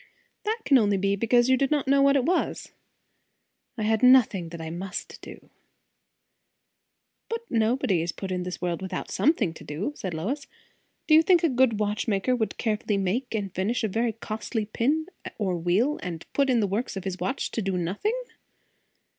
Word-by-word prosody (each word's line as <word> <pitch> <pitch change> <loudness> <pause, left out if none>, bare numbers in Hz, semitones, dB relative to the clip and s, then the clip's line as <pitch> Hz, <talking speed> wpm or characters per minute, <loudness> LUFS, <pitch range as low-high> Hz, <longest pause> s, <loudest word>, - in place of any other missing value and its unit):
"That 435 +2 0
can 275 - +6
be - - +4
only 205 -2 +2 0.2
because 240 +4 +3
you 260 - +5
did 270 +1 +1
not 295 -3 0
know 275 +1 +4
what 280 0 +5
it 270 - +3
was." 360 +3 -1 1.1
"I 220 - -2
had 220 0 +1
nothing 240 -9 +5
that 170 0 -8
I 160 0 -5
must 180 +3 -6
do." - - -12 1.8
"But 460 0 -2
nobody 220 -5 +2
is 170 +1 -2
put 190 +2 -6
in 180 -1 -1
this 180 0 -5
world 175 -1 -2
without 190 -1 -5
some 305 - +4
thing 215 - -2
to - - -12
do," 170 - -4
said 185 - -5
Lois. 255 - -3 0.6
"Do 310 - +3
you 315 - +9
think 345 +1 +4
a 330 - +4
good 250 -4 +2
watchmaker 210 +2 0
would 220 -3 -2
carefully 215 -2 -1
make 210 +6 -1
and 200 -4 -3
finish 210 +7 -1
a - - +2
very 225 +3 0
costly 220 0 -4
pin 280 +9 0 0.3
or 190 -4 -1
wheel, 185 - +1
and 170 -3 -6
put 275 -1 +2
it - - +4
in 235 - +3
the - - +2
works 200 +2 -2
of 190 - -5
his 190 -1 -4
watch 260 - -2
to 230 - -2
do 195 -2 -1
nothing?" 205 - -1
220 Hz, 195 wpm, -26 LUFS, 190-260 Hz, 1.8 s, you